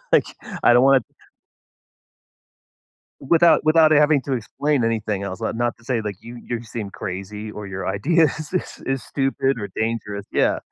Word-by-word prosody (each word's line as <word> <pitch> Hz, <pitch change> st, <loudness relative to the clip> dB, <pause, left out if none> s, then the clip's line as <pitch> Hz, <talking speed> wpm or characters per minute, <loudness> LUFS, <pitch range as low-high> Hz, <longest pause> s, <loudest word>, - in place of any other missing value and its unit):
Like, -, -, +5 dB, 0.4 s
I 120 Hz, -, +6 dB
don't 125 Hz, -, +6 dB
wanna 135 Hz, -2 st, +5 dB, 2.2 s
Without 165 Hz, +4 st, +4 dB
without 155 Hz, 0 st, +5 dB
having 150 Hz, -1 st, +4 dB
to 135 Hz, -, -4 dB
explain 130 Hz, +2 st, -1 dB
anything 110 Hz, -3 st, -1 dB
else. 100 Hz, +2 st, -5 dB
Li 110 Hz, -, -2 dB
not 120 Hz, +1 st, -1 dB
to 115 Hz, -, -22 dB
say, 120 Hz, -2 st, -1 dB
like, 105 Hz, -3 st, -5 dB
you 120 Hz, +1 st, -10 dB
you 120 Hz, -1 st, -4 dB
seem 110 Hz, -2 st, -6 dB
crazy, 100 Hz, +4 st, -6 dB
or 105 Hz, -1 st, -8 dB
your 95 Hz, -1 st, -5 dB
idea 160 Hz, -, +2 dB
is 155 Hz, +2 st, -3 dB
is 185 Hz, -, -4 dB
is 135 Hz, -2 st, -1 dB
stupid 135 Hz, 0 st, -1 dB
or 100 Hz, -, -4 dB
dangerous. 105 Hz, -3 st, -3 dB
Yeah. -, -, +2 dB
120 Hz, 170 wpm, -22 LUFS, 105-140 Hz, 2.2 s, I